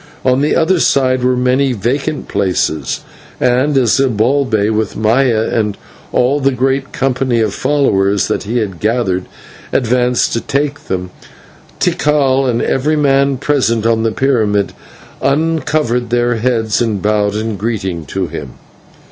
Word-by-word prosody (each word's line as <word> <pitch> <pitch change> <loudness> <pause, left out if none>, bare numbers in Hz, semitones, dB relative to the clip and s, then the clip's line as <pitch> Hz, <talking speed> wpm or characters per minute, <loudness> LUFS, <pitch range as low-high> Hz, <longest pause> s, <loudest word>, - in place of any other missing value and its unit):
On 130 +1 +3
the 150 - +1
other 170 +2 +2
side 130 -4 +2
were 125 0 +2
many 130 +1 +2
vacant 135 +7 -2
places; 90 -5 -1 0.4
and 130 +4 +2
as 125 -4 +3
Zibalbay, 120 -3 +1
with 110 -1 -2
Maya 115 +1 +2
and 105 -3 -1 0.3
all 135 +4 +2
the 135 0 +2
great 135 +2 -1
company 130 -2 0
of 110 -3 0
followers 105 -9 +1
that - - -1
he 115 +4 -3
had 100 -7 -3
gathered, 105 -5 0 0.5
advanced 125 0 +1
to 115 - -1
take 145 +1 -2
them, 90 -1 -4 0.7
Tikal 135 -3 +2
and 120 -1 0
every 150 +4 +1
man 140 -2 +2
present 120 -5 0
on 115 -1 +2
the 115 0 0
pyramid 110 -6 +1 0.5
uncovered 150 -4 0
their 120 0 +1
heads 115 -2 0
and 110 -4 0
bowed 105 0 0
in 110 0 -2
greeting 95 -6 -3
to 95 -1 -2
him. 70 -6 -7
125 Hz, 140 wpm, -15 LUFS, 110-135 Hz, 0.7 s, On